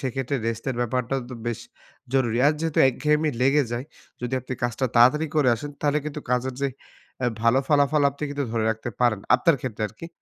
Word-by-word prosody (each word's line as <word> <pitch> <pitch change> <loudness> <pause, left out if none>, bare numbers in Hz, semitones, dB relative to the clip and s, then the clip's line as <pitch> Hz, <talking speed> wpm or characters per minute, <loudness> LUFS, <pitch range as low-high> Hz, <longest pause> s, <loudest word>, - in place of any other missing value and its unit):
সেক্ষেত্রে 135 +1 -2
রেস্টের 115 +2 -2
ব্যাপারটাও 125 +2 -1
তো - - -6
বেশ 120 -2 -2 0.5
জরুরি। 120 -4 +1
আর 150 - +5
যেহেতু 165 -2 -1
একঘেয়েমি 150 +3 +1
লেগে 140 +2 +4
যায়। 120 +3 -3 0.4
যদি 125 0 -4
আপনি 130 - -7
কাজটা 120 +2 0
তাড়াতাড়ি 130 +7 +5
করে 140 -4 +4
আসেন, 145 +6 -6
তাহলে 150 0 +2
কিন্তু 150 0 -5
কাজের 125 +1 0
যে 140 - +2 0.5
অ্যা 125 - +2
ভালো 115 +3 +4
ফলাফল 145 0 +3
আপনি 140 +2 -12
কিন্তু 145 0 -2
ধরে 115 -1 0
রাখতে 110 +2 -4
পারেন। 120 -5 +2
আপনার 165 -5 +3
ক্ষেত্রে 115 -5 -4
আরকি। 115 +11 -10
130 Hz, 190 wpm, -24 LUFS, 120-145 Hz, 0.5 s, আর